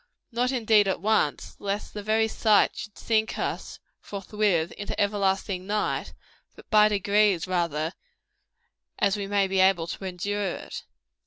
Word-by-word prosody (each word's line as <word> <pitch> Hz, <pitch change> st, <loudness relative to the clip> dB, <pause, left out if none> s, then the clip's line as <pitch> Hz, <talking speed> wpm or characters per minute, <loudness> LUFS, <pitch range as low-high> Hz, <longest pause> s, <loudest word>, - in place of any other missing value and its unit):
Not 245 Hz, +2 st, 0 dB
indeed 220 Hz, -5 st, +3 dB
at 190 Hz, -, 0 dB
once, 205 Hz, -6 st, 0 dB
lest 200 Hz, +1 st, -3 dB
the 210 Hz, -, -5 dB
very 220 Hz, +2 st, +2 dB
sight 215 Hz, -1 st, +3 dB
should 210 Hz, -, -8 dB
sink 220 Hz, -1 st, 0 dB
us, -, -, -4 dB, 0.2 s
forthwith, 200 Hz, -4 st, -1 dB
into 205 Hz, -, -6 dB
everlasting 195 Hz, -2 st, 0 dB
night; 210 Hz, +1 st, -2 dB, 0.4 s
but -, -, -15 dB
by 210 Hz, -1 st, +7 dB
degrees, 205 Hz, -3 st, +2 dB
rather, 170 Hz, -3 st, -1 dB, 1.0 s
as 200 Hz, 0 st, +2 dB
we 200 Hz, -1 st, -4 dB
may 200 Hz, -1 st, +2 dB
be 190 Hz, 0 st, 0 dB
able 185 Hz, -3 st, +4 dB
to 180 Hz, +3 st, -6 dB
endure 190 Hz, +1 st, -2 dB
it. -, -, -8 dB
200 Hz, 145 wpm, -26 LUFS, 190-215 Hz, 1.0 s, by